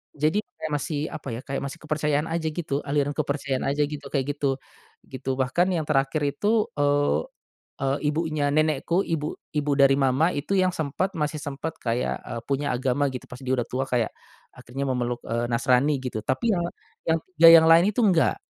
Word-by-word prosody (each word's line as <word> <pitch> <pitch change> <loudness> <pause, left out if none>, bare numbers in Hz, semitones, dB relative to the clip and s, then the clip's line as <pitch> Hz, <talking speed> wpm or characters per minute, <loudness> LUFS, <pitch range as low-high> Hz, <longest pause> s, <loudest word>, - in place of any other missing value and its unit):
Jadi 155 +7 +1
kayak 180 -5 -8
masih, 145 +1 -2
apa 155 -3 -8
ya, 120 - -6
kayak 135 - -3
masih 140 - -5
kepercayaan 150 -1 0
aja 165 -1 -1
gitu, 155 -3 -2
aliran 145 0 +1
kepercayaan 140 -3 -2
aja 145 +2 +1
gitu, 145 -1 -5
kayak 140 0 -1
gitu, 140 -2 0 0.5
gitu, 135 0 -5
bahkan 130 +7 +1
yang 170 -3 0
terakhir 145 0 0
itu, 205 +10 +1
eee 145 - +2 0.5
eee, 135 -1 -1
ibunya 155 -1 0
nenekku, 155 +4 +1
ibu 155 -4 -2 0.2
ibu 150 -1 -1
dari 140 0 +5
Mama 135 +5 +3
itu 160 +5 -2
yang 185 -1 +3
sempet, 160 +4 -2
masih 150 0 -2
sempet 145 +3 -5
kayak, 120 +1 -1
eee, 120 - -5
punya 140 +1 0
agama 130 +2 0
gitu 125 - -7
pas 125 - -10
dia 130 - -2
udah 125 -3 0
tua, 130 +2 -2
kayak 125 -4 0 0.4
akhirnya 135 +3 -5
memeluk, 125 -2 -1
eee, 120 +1 -1
Nasrani 125 +4 +2
gitu, 125 -4 -5
tapi 225 - +1
ya 175 - -1 0.5
yang 165 - +2 0.2
ya 165 0 +9
yang 165 -1 +8
lain 170 +5 +6
itu 215 - -3
enggak, 180 - +3
145 Hz, 185 wpm, -25 LUFS, 135-160 Hz, 0.5 s, ya